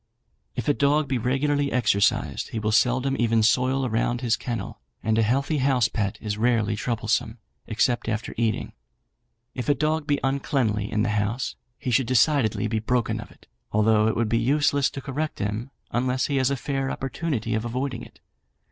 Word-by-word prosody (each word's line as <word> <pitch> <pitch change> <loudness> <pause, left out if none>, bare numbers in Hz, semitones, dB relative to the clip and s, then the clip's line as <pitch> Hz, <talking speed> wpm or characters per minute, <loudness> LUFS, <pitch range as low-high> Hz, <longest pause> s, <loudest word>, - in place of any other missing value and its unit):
"If - - -4
a 145 - +4
dog 145 +1 +2
be 130 -2 0
regularly 140 +4 0
exercised 105 -5 +1
he - - -5
will 105 0 0
seldom 125 +4 +2
even 115 -1 +3
soil 130 +4 +2
around 120 +1 0
his 120 -3 +2
kennel, 120 -2 -5 0.2
and 110 -1 +1
a 115 - +3
healthy 140 +7 +1
house 130 -3 +2
pet 100 -3 -2
is 105 -1 -4
rarely 115 -2 +2
troublesome, 110 0 -1 0.3
except 120 +1 +1
after 110 +2 -3
eating. 115 -2 -1 0.8
If 125 +2 -4
a 145 - +4
dog 155 0 0
be 145 -1 +1
uncleanly 130 -6 0
in 105 - +1
the 110 - 0
house, 105 +5 -1 0.2
he 125 - -3
should 120 +1 +2
decidedly 125 -2 +2
be 110 0 0
broken 120 +2 0
of - - -9
it, - - -20 0.3
although 110 0 +3
it 110 - +1
would 115 -1 +1
be 115 +1 +1
useless 140 +2 +2
to 135 - -7
correct 145 +4 -3
him 105 +5 -3 0.2
unless 125 +1 0
he 140 - -1
has 130 -1 +2
a 140 - 0
fair 135 +1 -2
opportunity 135 -4 -3
of 110 0 0
avoiding 125 +1 -3
it. - - -13
120 Hz, 185 wpm, -25 LUFS, 110-135 Hz, 0.8 s, a